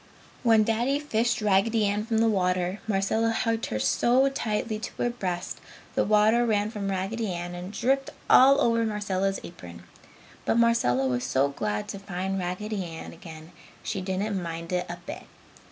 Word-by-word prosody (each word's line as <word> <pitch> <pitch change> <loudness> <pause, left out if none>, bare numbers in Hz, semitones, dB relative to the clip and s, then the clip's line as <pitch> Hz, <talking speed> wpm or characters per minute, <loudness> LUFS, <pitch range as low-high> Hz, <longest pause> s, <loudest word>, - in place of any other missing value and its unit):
When 225 -3 +5
Daddy 235 +6 +1
fished 235 -6 0
Raggedy 210 +2 +3
Ann 205 +2 -1
from 225 -1 0
the 225 +1 +4
water, 185 -2 0
Marcella 215 +2 +1
hugged 225 0 0
her 110 - -2
so 240 - +3
tightly 220 -4 -2
to 220 - -5
her 240 - -1
breast 185 -7 -4 0.3
the - - +2
water 215 +3 +4
ran 215 -2 +1
from 200 -3 -3
Raggedy 195 +3 -2
Ann 175 0 -5
and 180 +2 -6
dripped 265 +5 0 0.2
all 275 +2 +7
over 230 -1 +3
Marcella's 195 -3 -1
apron. 85 - -11 0.6
But - - +1
Marcella 230 - +3
was 125 -1 0
so 135 +2 +1
glad 105 -6 -3
to 200 - -5
find 195 0 -3
Raggedy 190 +3 -3
Ann 165 -2 -8
again 160 0 -11 0.3
she 195 - -3
didn't 190 +1 -2
mind 165 0 -6
it 180 0 -1
a 175 - -5
bit. - - -7
200 Hz, 170 wpm, -27 LUFS, 180-225 Hz, 0.6 s, all